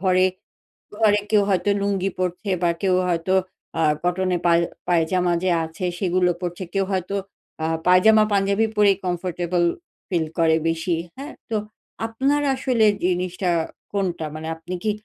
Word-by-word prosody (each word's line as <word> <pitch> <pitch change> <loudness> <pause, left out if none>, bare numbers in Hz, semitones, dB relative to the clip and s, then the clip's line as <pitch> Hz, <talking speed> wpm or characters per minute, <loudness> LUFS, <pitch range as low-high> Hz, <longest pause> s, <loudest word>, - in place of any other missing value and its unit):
ঘরে 185 0 +3 0.7
ঘরে 210 -2 +4
কেউ 210 -2 +5
হয়তো 195 +1 +1
লুঙ্গি 195 -1 0
পড়ছে 185 +3 -2
বা 175 - +3
কেউ 190 -2 +3
হয়তো 175 +2 0 0.5
আ - - +2 0.2
কটন 185 +1 0
এ - - -2 0.5
পায়জামা 175 +1 +2
যে 185 - +2
আছে 160 +3 -7
সেগুলো 180 -1 +2
পড়ছে। 175 +1 -4
কেউ 195 -1 +2
হয়তো 190 +1 -1 0.5
আ - - +1 0.2
পায়জামা-পাঞ্জাবি 200 +2 +4
পরে 205 -1 +5
কমফোর্টেবল 175 -1 -1 0.5
ফিল 170 -5 0
করে 160 -1 +4
বেশি। 165 +1 0 0.2
হ্যাঁ, 280 +4 -8 0.2
তো 220 - 0 0.5
আপনার 270 +6 0
আসলে 255 -4 +2 0.2
জিনিসটা 180 0 -1 0.4
কোনটা? 180 -5 -1
মানে 155 +1 -6
আপনি 165 +3 -7
কি 215 - +2
185 Hz, 140 wpm, -23 LUFS, 175-200 Hz, 0.7 s, কেউ